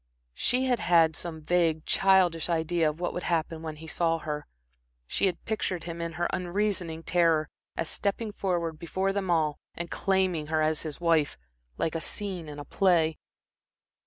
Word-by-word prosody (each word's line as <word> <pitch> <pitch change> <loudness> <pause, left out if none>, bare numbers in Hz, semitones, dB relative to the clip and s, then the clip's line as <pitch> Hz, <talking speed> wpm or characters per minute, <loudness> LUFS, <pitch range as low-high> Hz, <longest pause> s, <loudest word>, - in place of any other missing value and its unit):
She 255 - +1
had 250 -3 +2
had 165 -3 +4
some 160 -2 -4
vague, 165 -2 +2
childish 185 -4 +3
idea 165 -1 +2
of 150 +2 -7
what 175 - -1
would 180 - -3
happen 165 -2 -1
when 160 -1 -5
he 160 +1 -11
saw 165 +1 +1
her. 150 -2 -4 0.6
She 195 - +1
had 180 -2 -3
pictured 190 -5 -2
him 170 0 -5
in 170 0 -3
her 175 +1 0
unreasoning 180 -3 -1
terror, 165 -3 +3 0.3
as 165 - -1
stepping 210 +4 -1
forward 170 -5 -1
before 190 +3 -1
them 195 -2 -2
all 155 -3 +2 0.2
and 170 0 -5
claiming 185 -5 +1
her 155 0 +1
as 155 0 +1
his 155 -3 -6
wife, 165 -4 +2 0.4
like 160 - 0
a 165 - -2
scene 185 -6 -5
in 145 - -8
a 145 - -7
play. 165 -2 +2
170 Hz, 175 wpm, -28 LUFS, 160-185 Hz, 0.6 s, had